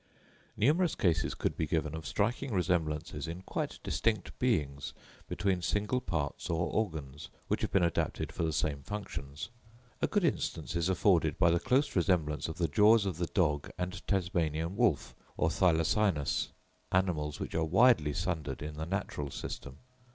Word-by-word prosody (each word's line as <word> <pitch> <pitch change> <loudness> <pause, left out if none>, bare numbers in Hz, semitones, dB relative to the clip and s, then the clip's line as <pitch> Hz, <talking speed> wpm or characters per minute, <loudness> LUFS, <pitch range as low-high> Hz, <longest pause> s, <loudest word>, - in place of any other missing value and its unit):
Numerous 155 - +3
cases 85 -3 +1
could - - -1
be 80 - -1
given 80 -1 0
of 80 0 -5
striking 120 +6 0
resemblances 85 -7 -1
in 85 +3 -6
quite - - -3
distinct 110 +8 -1
beings 75 - 0 0.3
between 95 -3 0
single 105 +7 0
parts 75 - -3
or 85 0 0
organs, 75 -8 -3 0.2
which - - 0
have - - 0
been 95 - +3
adapted 85 - 0
for - - -5
the 80 -1 +1
same 70 -1 -1
functions. 75 -5 -6 0.5
A - - +3
good 205 -3 +1
instance 90 - -1
is 85 +1 +1
afforded 85 -5 +3
by 85 - +5
the 85 - +3
close 135 - +1
resemblance 85 -5 +1
of 80 - -6
the 85 - +1
jaws 105 +7 +5
of 95 -5 -2
the 85 -1 -1
dog 75 -7 +1
and 90 +1 -3
Tasmanian 85 -3 0
wolf 110 - +1 0.2
or 80 - +2
Thylacinus—animals 80 -2 0
which - - -5
are 80 - +1
widely 80 - +4
sundered 80 -5 -2
in 75 0 -6
the 80 +1 -4
natural 85 -6 -3
system. 70 0 -6
85 Hz, 160 wpm, -31 LUFS, 75-100 Hz, 0.5 s, by